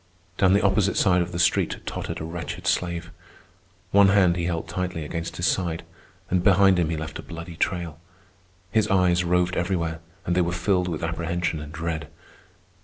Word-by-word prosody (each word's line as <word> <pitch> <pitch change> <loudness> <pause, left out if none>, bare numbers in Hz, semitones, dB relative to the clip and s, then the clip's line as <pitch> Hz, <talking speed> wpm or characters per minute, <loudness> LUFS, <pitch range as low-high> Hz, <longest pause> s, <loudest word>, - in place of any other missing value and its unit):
Down 95 -1 +5
the 100 - +3
opposite 100 0 +2
side 90 -3 +4
of 85 0 -3
the 85 - -4
street 85 - +2
tottered - - -4
a - - -5
wretched 85 +2 -6
slave. 90 -2 -1 0.8
One 100 0 +6
hand 95 -3 +4
he 85 -1 -2
held 85 -2 -2
tightly 85 -2 -3
against 85 +2 -5
his 85 - -1
side, 85 -5 0 0.4
and 90 -2 +1
behind 95 -2 +5
him 85 -2 +1
he 80 - -1
left 80 -1 -6
a - - -4
bloody 85 0 -8
trail. 85 -2 -2 0.7
His 110 0 +2
eyes 90 -3 +3
roved 90 +1 +1
everywhere, 85 -2 -1 0.3
and 85 - 0
they 90 - +4
were 85 0 0
filled 90 +1 +1
with 85 -3 -3
apprehension 80 0 -2
and 75 0 -8
dread. 80 -1 -4
85 Hz, 180 wpm, -25 LUFS, 85-90 Hz, 0.8 s, One